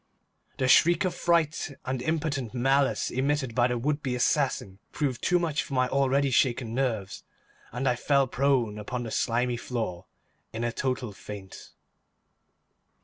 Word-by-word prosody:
The 130 Hz, -1 st, +1 dB
shriek 170 Hz, +6 st, +5 dB
of 185 Hz, -, 0 dB
fright 165 Hz, -3 st, +1 dB
and 130 Hz, -1 st, -2 dB
impotent 145 Hz, -5 st, -2 dB
malice 135 Hz, +3 st, +2 dB
emitted 135 Hz, -1 st, 0 dB
by 120 Hz, 0 st, +3 dB
the 125 Hz, 0 st, -1 dB
would 145 Hz, +5 st, -1 dB
be 130 Hz, -4 st, -2 dB
assassin 125 Hz, -7 st, 0 dB
proved 135 Hz, -5 st, -2 dB
too 180 Hz, -, +3 dB
much 160 Hz, -5 st, 0 dB
for 135 Hz, -, -6 dB
my 130 Hz, 0 st, +3 dB
already 135 Hz, 0 st, +2 dB
shaken 120 Hz, -2 st, +1 dB
nerves, 115 Hz, -7 st, -2 dB, 0.5 s
and 130 Hz, +3 st, -2 dB
I 125 Hz, -, +3 dB
fell 140 Hz, +2 st, +2 dB
prone 125 Hz, -5 st, +1 dB
upon 120 Hz, +4 st, -4 dB
the 115 Hz, -, -6 dB
slimy 120 Hz, +1 st, 0 dB
floor 115 Hz, -8 st, -4 dB, 0.5 s
in 115 Hz, +1 st, -3 dB
a 120 Hz, -, 0 dB
total 130 Hz, -2 st, -2 dB
faint. 100 Hz, -1 st, -10 dB
130 Hz, 150 wpm, -27 LUFS, 120-140 Hz, 0.5 s, shriek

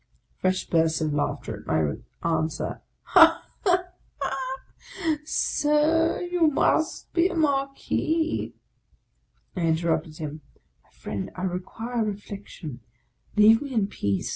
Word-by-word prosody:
Fresh 185 Hz, 0 st, 0 dB
bursts 160 Hz, -1 st, +3 dB
of 155 Hz, -2 st, 0 dB
laughter 145 Hz, -, -2 dB
at -, -, -16 dB
my 80 Hz, -2 st, +1 dB, 0.3 s
answer. 160 Hz, -1 st, -1 dB
" -, -, -47 dB
Ha, -, -, +7 dB, 0.2 s
ha, 365 Hz, -3 st, +3 dB, 0.4 s
ha! 265 Hz, 0 st, -2 dB, 0.7 s
Sir, 305 Hz, +2 st, +2 dB
you 350 Hz, -2 st, +2 dB
must 315 Hz, +2 st, +1 dB
be 345 Hz, +1 st, +4 dB
a 370 Hz, -, -5 dB
Marquis." 305 Hz, +2 st, 0 dB, 1.0 s
I 180 Hz, -, -2 dB
interrupted 160 Hz, -1 st, 0 dB
him, 155 Hz, 0 st, -6 dB, 0.2 s
" -, -, -42 dB
My -, -, -31 dB
friend, 100 Hz, -2 st, -5 dB
I 185 Hz, -, -5 dB
require 225 Hz, +6 st, -2 dB
reflection: 200 Hz, -, -6 dB, 0.6 s
leave 220 Hz, +2 st, +7 dB
me 280 Hz, -3 st, -5 dB
in 215 Hz, -3 st, +3 dB
peace." 100 Hz, -, -1 dB
210 Hz, 125 wpm, -26 LUFS, -, 1.0 s, Ha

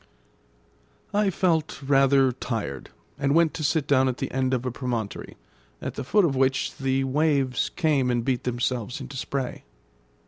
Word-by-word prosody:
I 205 Hz, -1 st, +3 dB
felt 165 Hz, -4 st, 0 dB
rather 135 Hz, -1 st, +4 dB
tired, 115 Hz, -, -4 dB, 0.3 s
and 140 Hz, +2 st, +1 dB
went 165 Hz, -2 st, +4 dB
to 155 Hz, -, -5 dB
sit 155 Hz, 0 st, +1 dB
down 130 Hz, -2 st, +3 dB
at 125 Hz, -, -3 dB
the -, -, -4 dB
end 130 Hz, 0 st, 0 dB
of 130 Hz, -1 st, -1 dB
a 125 Hz, -, -1 dB
promontory, 120 Hz, -4 st, -4 dB, 0.4 s
at -, -, -5 dB
the 140 Hz, -, -5 dB
foot 200 Hz, +9 st, +3 dB
of 140 Hz, -5 st, 0 dB
which 130 Hz, 0 st, +1 dB
the 135 Hz, 0 st, 0 dB
waves 135 Hz, -2 st, +1 dB
came 150 Hz, -7 st, +1 dB
and 120 Hz, -1 st, 0 dB
beat 130 Hz, -2 st, 0 dB
themselves 120 Hz, -1 st, -2 dB
into 135 Hz, -, -8 dB
spray. 130 Hz, 0 st, -4 dB
135 Hz, 165 wpm, -25 LUFS, 125-145 Hz, 0.4 s, rather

